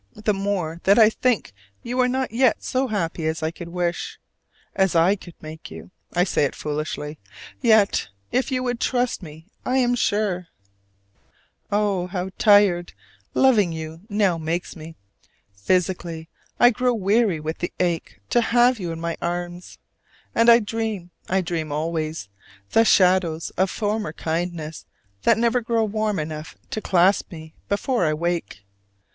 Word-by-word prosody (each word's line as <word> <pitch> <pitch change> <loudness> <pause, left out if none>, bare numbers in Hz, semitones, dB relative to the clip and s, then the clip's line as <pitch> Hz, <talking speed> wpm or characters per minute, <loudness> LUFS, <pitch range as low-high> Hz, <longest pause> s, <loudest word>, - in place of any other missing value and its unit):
the 210 0 0
more 190 -5 -2
that 200 +1 +5
I 220 -1 +7
think 235 - 0 0.3
you 245 +2 -3
are 250 - +4
not 260 +1 -1
yet 245 +1 +2
so 260 +1 0
happy 170 -7 -2
as 160 0 -2
I 160 - 0
could 170 0 -9
wish, 175 0 -3 0.5
as 190 -2 +1
I 170 +4 +5
could 175 -4 -13
make 155 +1 -9
you, - - -11 0.2
I 175 - +4
say 180 - +1
it 140 - -3
foolishly: 150 0 -4 0.4
yet 220 -4 +4 0.2
if 260 +2 0
you 255 -1 0
would 245 -2 -2
trust 250 -3 0
me, 160 -2 -11 0.2
I 255 +1 0
am 245 -2 +3
sure. 205 -6 0 1.2
Oh, 200 -3 +1
how 185 0 -4
tired 200 -4 +4 0.4
loving 220 -9 +4
you 160 0 -7
now 200 -5 +1
makes 165 +2 -3
me! 160 0 -10 0.6
physically 170 - -1 0.3
I 245 - +7
grow 250 +1 +1
weary 205 -3 +2
with 155 +1 -4
the 175 - -3
ache 170 - -1
to 240 - +4
have 240 +1 +3
you 175 -3 -3
in 165 - -5
my 170 0 -3
arms. 175 +1 -4 0.6
And 230 +1 +4
I 235 0 +8
dream, 210 -4 -3 0.2
I 190 +1 +2
dream 165 -4 -3
always, 155 -4 -2 0.4
the 225 - +5
shadows 180 -5 +3
of 190 +1 +1
former 210 -6 -2
kindness 165 -1 -4 0.3
that 230 - +4
never 235 +2 +2
grow 230 0 +1
warm 215 -1 -1
enough 155 0 -5
to 215 - -3
clasp 190 +1 +3
me 160 -2 -10 0.2
before 235 +3 0
I 155 -2 +2
wake. 170 - -3
185 Hz, 155 wpm, -23 LUFS, 165-220 Hz, 1.2 s, I